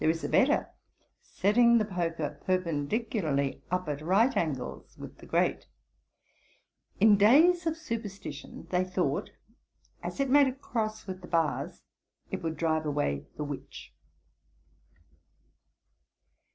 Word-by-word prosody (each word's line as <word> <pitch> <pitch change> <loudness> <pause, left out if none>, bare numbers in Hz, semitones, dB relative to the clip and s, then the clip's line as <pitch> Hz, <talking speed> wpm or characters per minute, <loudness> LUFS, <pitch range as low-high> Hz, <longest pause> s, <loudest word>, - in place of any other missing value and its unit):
There - - +3
is 165 0 -1
a - - -2
better; 285 +3 +3 0.5
(setting 235 +4 +3
the 215 - +2
poker 165 -6 -3
perpendicularly 165 - -1
up 180 0 -1
at 145 -1 -3
right 200 - +3
angles 140 -7 -3
with - - -10
the - - -13
grate.) - - 0 1.3
In 210 0 +6
days 325 - +5
of 325 0 -1
superstition 205 - -6
they 180 0 +2
thought, 185 0 -1 0.7
as - - -6
it 275 - +2
made 285 0 +6
a 260 - -1
cross 220 -5 -4
with 185 -1 -6
the 180 - -10
bars, 165 -3 -1 0.5
it - - -3
would 160 -2 -3
drive 160 -1 0
away 140 - -1
the 150 - -3
witch.' 145 -1 -8
185 Hz, 125 wpm, -29 LUFS, 155-230 Hz, 1.3 s, In